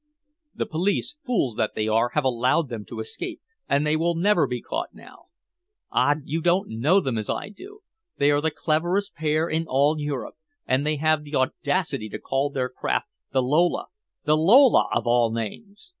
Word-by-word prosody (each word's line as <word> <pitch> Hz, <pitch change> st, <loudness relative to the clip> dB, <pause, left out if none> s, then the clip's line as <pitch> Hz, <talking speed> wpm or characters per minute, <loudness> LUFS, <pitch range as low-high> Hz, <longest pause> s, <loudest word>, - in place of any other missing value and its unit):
"The -, -, -2 dB
police, 190 Hz, -, -1 dB
fools 195 Hz, -, -1 dB
that 110 Hz, -, -1 dB
they 110 Hz, -, -1 dB
are, 115 Hz, +2 st, +2 dB
have 150 Hz, -, +2 dB
allowed 130 Hz, +4 st, +1 dB
them 110 Hz, -3 st, -6 dB
to 115 Hz, -, -8 dB
escape, 110 Hz, -, -5 dB, 0.3 s
and 140 Hz, +2 st, +2 dB
they 150 Hz, +1 st, +2 dB
will 170 Hz, +2 st, +1 dB
never 180 Hz, +1 st, +3 dB
be 125 Hz, -1 st, -3 dB
caught 325 Hz, -, -5 dB
now. -, -, -16 dB, 0.7 s
Ah! 145 Hz, -, +3 dB
you 160 Hz, +3 st, -3 dB
don't 175 Hz, +3 st, +1 dB
know 140 Hz, -, +3 dB
them 130 Hz, -, -2 dB
as 110 Hz, -, -5 dB
I -, -, -3 dB
do! 405 Hz, -, -13 dB, 0.4 s
They 145 Hz, +1 st, +3 dB
are 145 Hz, 0 st, +2 dB
the 160 Hz, -, +1 dB
cleverest 175 Hz, +6 st, -1 dB
pair 155 Hz, +1 st, 0 dB
in 160 Hz, 0 st, -1 dB
all 145 Hz, +3 st, +2 dB
Europe. 145 Hz, -3 st, -4 dB, 0.3 s
And 130 Hz, +3 st, +1 dB
they 155 Hz, -, +1 dB
have 155 Hz, +1 st, +2 dB
the 150 Hz, 0 st, -6 dB
audacity 135 Hz, -, -1 dB
to -, -, -5 dB
call 135 Hz, +2 st, -1 dB
their 130 Hz, -2 st, -2 dB
craft 125 Hz, -, -2 dB, 0.2 s
the 130 Hz, -1 st, +2 dB
Lola 155 Hz, +7 st, +1 dB, 0.3 s
the 150 Hz, -, +3 dB
Lola, 230 Hz, -, +6 dB
of -, -, 0 dB
all 120 Hz, -1 st, +3 dB
names!" 200 Hz, -, -6 dB
150 Hz, 190 wpm, -24 LUFS, 130-170 Hz, 0.7 s, Lola